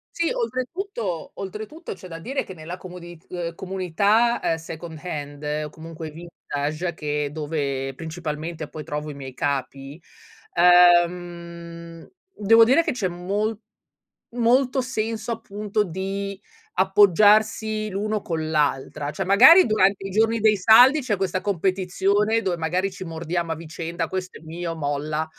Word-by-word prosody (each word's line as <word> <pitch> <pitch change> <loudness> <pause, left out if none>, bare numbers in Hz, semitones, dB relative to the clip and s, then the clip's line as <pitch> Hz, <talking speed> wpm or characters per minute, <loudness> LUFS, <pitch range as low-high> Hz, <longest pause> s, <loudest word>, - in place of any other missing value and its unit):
Sì, 335 -1 +1
oltretutto 255 - -3
oltretutto 215 - -7
c'è 185 -1 -12
da 165 -1 -7
dire 265 +10 -3
che 190 - -10
nella 170 +1 -7
comodi 180 -2 -10
uhm, 170 -2 -4
comunità 200 +6 +1
è 165 - 0
second 160 0 -8
hand 145 -4 -6 0.3
o - - -12
comunque 160 0 -9
vintage, 160 0 -4
che 150 -1 -2
è - - -7
dove 140 -3 -3
principalmente 160 0 -5
poi 155 +1 -8
trovo 150 +1 -5
i - - -6
miei 135 -2 -9
capi, 140 +2 -3 0.5
ehm, 170 -1 +2 0.3
devo 225 +2 +6
dire 265 +8 +4
che - - -1
c'è 220 -7 -1
mol 200 +5 -2 0.8
molto 250 +3 +2
senso 230 -2 -3
appunto 210 -2 -2
di 195 +2 -4 0.3
appoggiarsi 210 +3 +4
l'uno 210 +2 -2
con 160 -3 -3
l'altra. 145 -1 0
Cioè, 190 - -3
magari 320 - +8
durante 195 -2 +2
i - - -8
giorni 225 +3 +2
dei 215 -1 +4
saldi 245 +9 +7
c'è 245 -5 0
questa 185 -1 -1
competizione 195 +3 +1
dove 185 -5 -1
magari 180 +4 -1
ci 185 0 -8
mordiamo 165 0 -3
a - - -7
vicenda: 165 +1 -5
"Questo 185 -1 -5
è - - -21
mio, 165 +1 -5
molla. 150 +1 -2
180 Hz, 140 wpm, -23 LUFS, 160-210 Hz, 0.8 s, magari